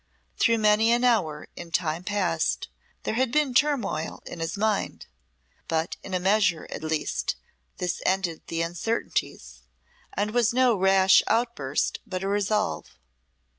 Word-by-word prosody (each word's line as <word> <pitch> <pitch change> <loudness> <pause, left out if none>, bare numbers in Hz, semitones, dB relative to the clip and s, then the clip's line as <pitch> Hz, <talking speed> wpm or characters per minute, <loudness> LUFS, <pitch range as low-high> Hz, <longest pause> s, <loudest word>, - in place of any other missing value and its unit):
Through 230 -1 +3
many 215 +1 +4
an 240 +1 +2
hour 180 -12 +1
in 170 - -8
time 165 0 -1
past 80 - -1 0.3
there - - -2
had 250 +1 +1
been 295 -2 +2
turmoil 265 - 0
in 175 - -8
his 165 +3 -3
mind, 215 -1 -1 0.6
but 160 0 -1
in 190 - -5
a - - +1
measure, 190 -3 +2
at - - -5
least, 155 - -1 0.4
this 180 -1 -2
ended 185 -4 0
the 165 0 -1
uncertainties, 175 +7 -3 0.5
and 205 +2 -1
was 235 0 +2
no 255 -2 +4
rash 190 0 +5
outburst 220 - 0
but 185 0 -4
a - - -1
resolve. 205 +1 -1
195 Hz, 140 wpm, -26 LUFS, 165-225 Hz, 0.6 s, rash